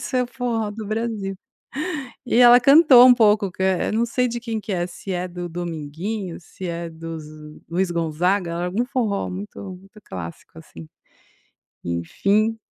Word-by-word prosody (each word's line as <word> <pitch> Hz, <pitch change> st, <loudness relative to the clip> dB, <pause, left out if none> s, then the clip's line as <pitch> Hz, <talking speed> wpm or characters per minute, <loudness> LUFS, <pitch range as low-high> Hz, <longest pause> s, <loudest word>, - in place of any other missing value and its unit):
isso 255 Hz, -, -3 dB
é 250 Hz, -, +3 dB
o -, -, -3 dB
forró 240 Hz, -4 st, -2 dB
do 215 Hz, 0 st, -7 dB
Brasil". 215 Hz, -3 st, -3 dB, 0.9 s
E 245 Hz, -, -1 dB
ela 245 Hz, 0 st, +8 dB
cantou 275 Hz, -2 st, +8 dB
um 250 Hz, -, +9 dB
pouco 210 Hz, -4 st, +3 dB
que, 190 Hz, -, -4 dB
eh 190 Hz, -1 st, +1 dB
eh, -, -, -1 dB
não 225 Hz, +2 st, +1 dB
sei 250 Hz, +2 st, 0 dB
de 240 Hz, 0 st, -4 dB
quem 230 Hz, -2 st, -4 dB
que 210 Hz, -, -7 dB
é, 175 Hz, -2 st, 0 dB
se 185 Hz, +2 st, -8 dB
é 180 Hz, 0 st, -2 dB
do 175 Hz, -1 st, -6 dB
Dominguinhos, 175 Hz, +3 st, -5 dB
se 185 Hz, -, -9 dB
é 170 Hz, 0 st, -4 dB
do 165 Hz, 0 st, -7 dB
zu 150 Hz, 0 st, -12 dB
Luiz 175 Hz, +3 st, 0 dB
Gonzaga. 170 Hz, +3 st, 0 dB
Era 170 Hz, +1 st, -2 dB
algum 205 Hz, +7 st, -1 dB
forró 230 Hz, -6 st, -1 dB
muito 195 Hz, +3 st, -7 dB
muito 195 Hz, +3 st, -15 dB
clássico 85 Hz, -3 st, -9 dB
assim, 80 Hz, -1 st, -12 dB, 1.0 s
enfim. 200 Hz, -, 0 dB
195 Hz, 180 wpm, -22 LUFS, 170-225 Hz, 1.0 s, um